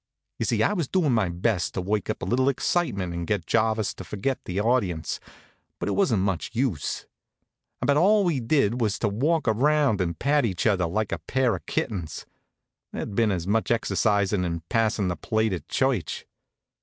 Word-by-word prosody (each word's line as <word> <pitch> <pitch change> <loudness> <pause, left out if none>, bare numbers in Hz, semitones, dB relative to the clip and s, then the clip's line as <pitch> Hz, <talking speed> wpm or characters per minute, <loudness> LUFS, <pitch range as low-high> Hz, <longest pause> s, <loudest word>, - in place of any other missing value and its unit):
You - - 0
see, - - +2
I - - +2
was 170 -8 -1
doin' 170 -5 +1
my 110 -6 +2
best 90 +1 -1
to 95 - -1
work 100 +2 -1
up - - -3
a - - -1
little 130 +3 +2
excitement 110 - -1
and 85 -1 -4
get 100 -6 -1
Jarvis 110 0 +1
to - - -9
forget 105 +8 -3
the 90 +2 -2
audience; 100 - 0 0.6
but - - -4
it - - 0
wasn't 120 - +2
much 95 -4 -1
use. 115 - -1 0.8
About 140 0 +3
all 205 +5 +5
we 170 -7 +1
did 120 -1 +1
was 105 -3 +1
to 110 - 0
walk 145 +9 0
around 135 -1 +3
and 85 -3 -2
pat 145 0 +2
each 95 -7 -1
other 95 -6 +2
like 105 +5 -1
a - - -2
pair 130 -3 +1
of - - -10
kittens. 100 - -3 0.7
There'd - - -5
been 110 0 +2
as 90 -3 -2
much 110 +3 +1
exercise 105 -3 +1
in 90 -4 0
passin' 110 -4 +1
the 90 - -1
plate 110 +1 0
at 85 - -5
church. - - 0
110 Hz, 190 wpm, -25 LUFS, 95-130 Hz, 0.8 s, all